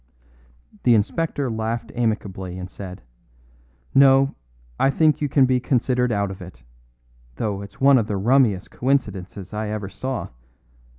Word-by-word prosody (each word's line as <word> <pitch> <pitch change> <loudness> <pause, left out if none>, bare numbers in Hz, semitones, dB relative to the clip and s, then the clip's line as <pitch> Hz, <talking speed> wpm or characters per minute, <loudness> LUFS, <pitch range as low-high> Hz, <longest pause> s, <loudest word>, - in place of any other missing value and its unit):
The 120 - +5
inspector 140 +6 0
laughed 115 0 -3
amicably 100 -6 -2
and 90 0 -7
said: 95 -1 -9 0.9
"No, 135 0 +5 0.5
I 135 - +4
think 155 +2 +2
you 145 - 0
can 135 0 +4
be 130 0 +2
considered 125 -1 +1
out 100 -2 0
of 95 - -10
it, 90 -10 -12 0.7
though 100 - -2
it's 100 0 -11
one 135 -1 +6
of 110 - -2
the 105 -3 -2
rummiest 110 -2 +2
coincidences 100 -8 -2
I 105 0 -3
ever 105 -2 -4
saw. 130 +6 -4
110 Hz, 140 wpm, -22 LUFS, 100-130 Hz, 0.9 s, one